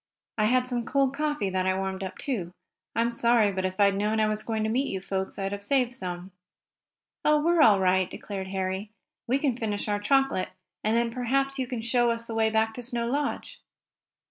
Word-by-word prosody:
I 215 - +4
had 250 +3 +2
some 245 -2 -1
cold 275 +2 +1
coffee 295 -9 -1
that 185 0 0
I 190 0 +2
warmed 190 0 -3
up, 185 0 -6
too. 190 -11 -3 0.4
I'm 235 +1 +2
sorry, 235 -3 +3
but 190 -1 -2
if 185 +1 -3
I 200 - +7
had 200 0 +3
known 210 +2 +1
I 215 - +4
was 215 0 -1
going 220 -1 -2
to - - +1
meet 260 +5 +1
you 190 - -3
folks 190 0 -4
I'd 195 0 -2
have 200 0 -5
saved 250 +1 +1
some." 180 -3 -6 0.9
"Oh, 300 0 +4
we're 335 +2 +3
all 210 -9 +7
right," 185 0 +2
declared 195 -2 -6
Harry. 190 +1 -3 0.4
"We 255 +3 +3
can 275 -4 0
finish 215 -4 -3
our 205 -1 0
chocolate, 270 -2 +2 0.3
and 220 +2 +2
then 235 0 +1
perhaps 270 +3 0
you 260 - -1
can 240 -3 -4
show 240 +1 +2
us 230 0 -1
the 230 - -6
way 220 0 +2
back 220 0 +1
to 245 - -6
Snow 240 -1 -3
Lodge." 280 +4 -2
220 Hz, 220 wpm, -27 LUFS, 195-250 Hz, 0.9 s, I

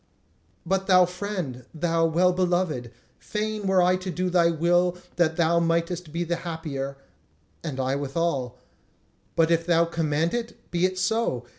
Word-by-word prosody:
But 190 +2 0
thou 185 -2 +6
friend, 180 - -5
thou 165 0 +1
well 180 +3 +3
beloved, 175 -8 0 0.3
fain 215 -1 -3
were 190 -1 +4
I 180 +1 +3
to 185 0 -6
do 180 0 -1
thy 170 -1 +4
will 175 +2 +2 0.2
that 160 -2 +2
thou 170 0 +3
mightest 170 0 -1
be 170 +2 -1
the 170 0 -1
happier...and 140 -2 -7
I 130 0 0
withal. 140 -3 -2 0.8
And 165 0 +4
if 165 0 +3
thou 170 -1 +4
command 165 -1 0
it, 235 -1 -5
be 175 +1 +2
it 185 0 -7
so! 185 - 0
170 Hz, 150 wpm, -25 LUFS, 160-180 Hz, 0.8 s, thou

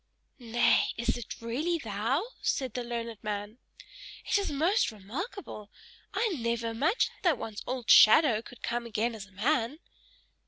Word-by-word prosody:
"Nay, 240 -1 +3
is 235 - 0
it 240 -3 -7
really 290 +10 -1
thou?" 230 - -1 0.2
said 260 -4 -1
the 250 - -3
learned 235 -2 -5
man. 210 +2 -4 0.7
"It - - 0
is 400 - -2
most 340 - +2
remarkable: 215 - -7 0.4
I 460 - +1
never 235 - -2
imagined 290 - 0
that 340 -7 +3
one's 220 -2 -6
old 250 -2 -4
shadow 225 -1 +7
could 240 +1 -14
come 235 0 -2
again 230 +1 -1
as 210 -3 -8
a - - -23
man." 235 +6 0
235 Hz, 150 wpm, -29 LUFS, 220-290 Hz, 0.7 s, shadow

